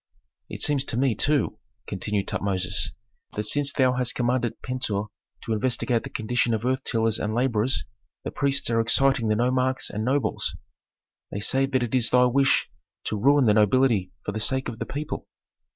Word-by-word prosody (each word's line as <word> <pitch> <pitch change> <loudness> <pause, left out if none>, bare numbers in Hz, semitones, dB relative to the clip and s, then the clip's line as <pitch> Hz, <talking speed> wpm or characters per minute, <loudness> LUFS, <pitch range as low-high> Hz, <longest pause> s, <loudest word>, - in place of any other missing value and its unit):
"It - - -4
seems 145 -2 +2
to 120 - -3
me, 130 -1 +2
too," 135 -1 +1 0.3
continued 100 +1 -2
Tutmosis, 95 -3 -1 0.5
"that 105 - -1
since 140 +6 0
thou 130 -3 +3
hast 125 -2 0
commanded 120 -1 0
Pentuer 110 -5 -2 0.3
to 115 - -2
investigate 120 +1 0
the - - -8
condition 115 +1 0
of 110 +2 -4
earth 130 +1 0
tillers 115 -1 0
and 110 +1 -2
laborers 120 - +1 0.4
the - - -4
priests 140 0 0
are 115 0 +3
exciting 120 +1 +2
the 110 - +2
nomarchs 130 +3 0
and 105 +1 -3
nobles. 135 +4 0 0.7
They 100 - -4
say 135 +6 +1
that 130 -2 0
it 120 - -4
is 125 -3 +2
thy 125 0 +5
wish 135 +2 +3 0.4
to - - -2
ruin 140 +6 +4
the 105 - +5
nobility 105 -2 +3
for - - -2
the 110 - -4
sake 130 +4 -1
of 115 -2 -8
the - - -4
people." 150 +2 -5
120 Hz, 180 wpm, -25 LUFS, 110-130 Hz, 0.7 s, thy